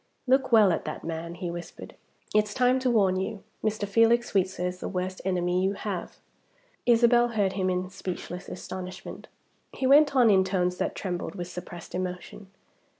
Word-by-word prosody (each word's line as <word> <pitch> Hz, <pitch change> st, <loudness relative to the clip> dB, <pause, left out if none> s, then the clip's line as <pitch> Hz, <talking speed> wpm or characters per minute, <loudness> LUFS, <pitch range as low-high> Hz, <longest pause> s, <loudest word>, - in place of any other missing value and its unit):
"Look 265 Hz, 0 st, +2 dB
well 215 Hz, -4 st, +6 dB
at 165 Hz, -, -1 dB
that -, -, -5 dB
man," 165 Hz, +1 st, -5 dB
he 175 Hz, -1 st, -4 dB
whispered. 175 Hz, 0 st, -9 dB, 0.4 s
"It's 210 Hz, -1 st, +2 dB
time 255 Hz, +1 st, +3 dB
to 255 Hz, -1 st, 0 dB
warn 195 Hz, -6 st, +3 dB
you. 200 Hz, +1 st, -4 dB, 0.2 s
Mr. 215 Hz, -1 st, -1 dB
Felix 230 Hz, +3 st, +3 dB
Sweetsir 190 Hz, -2 st, 0 dB
is 180 Hz, 0 st, -3 dB
the -, -, -4 dB
worst 185 Hz, 0 st, -3 dB
enemy 180 Hz, -1 st, 0 dB
you 195 Hz, +1 st, +1 dB
have!" 195 Hz, -3 st, -5 dB, 0.7 s
Isabel 240 Hz, 0 st, +5 dB
heard 205 Hz, -5 st, 0 dB
him 185 Hz, -2 st, 0 dB
in 180 Hz, 0 st, -1 dB
speechless 180 Hz, -1 st, -6 dB
astonishment. 185 Hz, 0 st, -7 dB, 0.5 s
He 265 Hz, -, -3 dB
went 285 Hz, +1 st, +6 dB
on 240 Hz, -4 st, +6 dB
in 190 Hz, -1 st, +5 dB
tones 180 Hz, -1 st, 0 dB
that -, -, -2 dB
trembled 180 Hz, 0 st, -4 dB
with 175 Hz, -2 st, -5 dB
suppressed 175 Hz, -1 st, -9 dB
emotion. 180 Hz, +2 st, -5 dB
190 Hz, 170 wpm, -27 LUFS, 180-225 Hz, 0.7 s, well